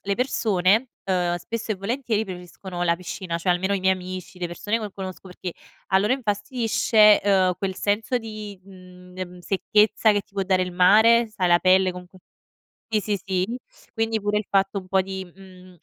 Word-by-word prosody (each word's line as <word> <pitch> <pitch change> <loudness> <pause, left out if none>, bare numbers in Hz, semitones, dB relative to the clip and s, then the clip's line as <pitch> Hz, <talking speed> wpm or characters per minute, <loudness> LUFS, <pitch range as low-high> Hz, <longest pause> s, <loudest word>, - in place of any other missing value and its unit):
le 200 0 -1
persone, 220 -2 +1 0.2
ehm, 180 -2 0
spesso 225 +6 -4
e - - -3
volentieri 220 +2 -2
preferiscono 180 -1 -7
la 170 - +3
piscina, 180 -1 -5
cioè 180 - 0
almeno 190 +3 0
i 195 - -1
miei 190 0 +3
amici, 185 0 -8
le 175 - -2
persone 205 +6 -2
che 210 -3 -6
conosco, 190 -1 -8
perché 180 0 -7 0.4
a 190 - +4
loro 210 +5 +1
infastidisce, 215 -2 +3
ehm, 190 -2 +3
quel 190 -1 -2
senso 215 +6 0
di, 215 -4 -8
mhmm, 180 -1 -15
ehm, 180 -1 -6
secchezza 210 +3 +2
che 205 - +1
ti 195 - -24
può 195 -1 -1
dare 185 -1 +2
il 180 - -3
mare, 220 +6 +5
sai 185 -4 -1
la 175 - +5
pelle 185 +1 +4
comunque 180 +1 -11 0.8
sì, 215 - +4
sì, 205 -1 -2
sì. 190 +5 -1 0.4
Quindi 225 -1 0
pure 205 0 0
il 210 - -2
fatto 195 0 +1
un 185 - -14
po' 190 0 +2
di, 190 0 -6
mhmm, 185 0 -16
195 Hz, 190 wpm, -24 LUFS, 185-210 Hz, 0.8 s, mare